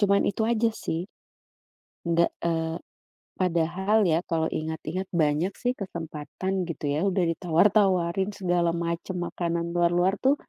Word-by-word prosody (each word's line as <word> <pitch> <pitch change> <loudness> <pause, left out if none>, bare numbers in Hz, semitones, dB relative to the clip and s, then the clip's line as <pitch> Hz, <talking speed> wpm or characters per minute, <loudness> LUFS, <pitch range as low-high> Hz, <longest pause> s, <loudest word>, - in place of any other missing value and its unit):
cuman 200 -1 +4
itu 205 +2 0
aja 230 0 +2
sih, 170 +3 -3 1.0
gak, 170 0 +3 0.2
eee, 165 -1 0 0.6
padahal 185 +4 +2
ya 160 +2 +3
kalau 160 -2 0
ingat-ingat 160 +4 -3
banyak 160 +3 +2
sih 245 0 0
kesempatan 175 +1 -4
gitu 165 -3 -5
ya, 150 +6 0
udah 190 -2 +2
ditawar-tawarin 185 +2 +2
segala 175 -3 +1
macem, 170 +2 -3
makanan 170 -1 -2
luar-luar 175 +3 +2
tuh, 270 +6 +3
175 Hz, 125 wpm, -26 LUFS, 165-195 Hz, 1.0 s, cuman